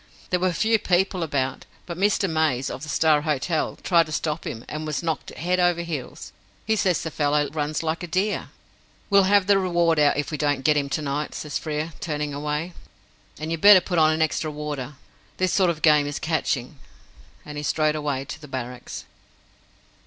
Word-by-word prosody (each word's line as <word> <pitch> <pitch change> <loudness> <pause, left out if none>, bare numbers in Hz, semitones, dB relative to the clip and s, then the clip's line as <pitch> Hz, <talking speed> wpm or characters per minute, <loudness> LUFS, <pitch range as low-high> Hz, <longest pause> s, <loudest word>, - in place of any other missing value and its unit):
There 180 - +2
were 185 0 +1
few 220 +5 +2
people 185 -1 +1
about, 135 -5 -2 0.2
but 170 - -6
Mr. 195 +2 +2
Mays, 155 -6 0
of - - -6
the 150 - -7
Star 155 -1 +3
Hotel, 155 +1 -1
tried 170 -3 +4
to - - -9
stop 155 +1 -2
him, 115 +1 -6
and 155 +1 -5
was 155 +2 -2
knocked 160 -3 -2
head 180 +4 0
over 175 -1 +2
heels. 155 -7 -6 0.3
He 220 - +2
says 185 -4 +1
the 160 - -4
fellow 145 0 +1
runs 150 0 -2
like 160 +1 -2
a 175 - -5
deer." 190 +5 -1 0.6
"We'll 200 -1 +6
have 200 -1 +5
the 200 0 +4
reward 170 -3 +2
out 145 -1 +4
if 145 - -2
we 150 - -4
don't 145 -3 0
get 150 +1 +4
him 140 -1 0
to 155 +2 -2
night," 145 +1 -3
says 150 -2 -4
Frere, 155 +1 -3
turning 150 -2 -3
away; 150 +4 -3 0.6
"and 155 +2 -5
you'd 165 -1 -3
better 205 -2 +9
put 175 -2 -1
on 155 0 +5
an 160 0 +2
extra 155 0 -1
warder. 150 -2 -5 0.4
This 185 -1 +1
sort 185 -3 +3
of 160 -2 -3
game 150 -2 +5
is 145 - -3
catching." 150 -4 -2 0.7
And 150 0 -8
he - - -5
strode 155 0 +1
away 145 -3 -2
to 160 - -8
the 150 - -10
Barracks. 125 -2 -6
155 Hz, 200 wpm, -24 LUFS, 145-175 Hz, 0.7 s, better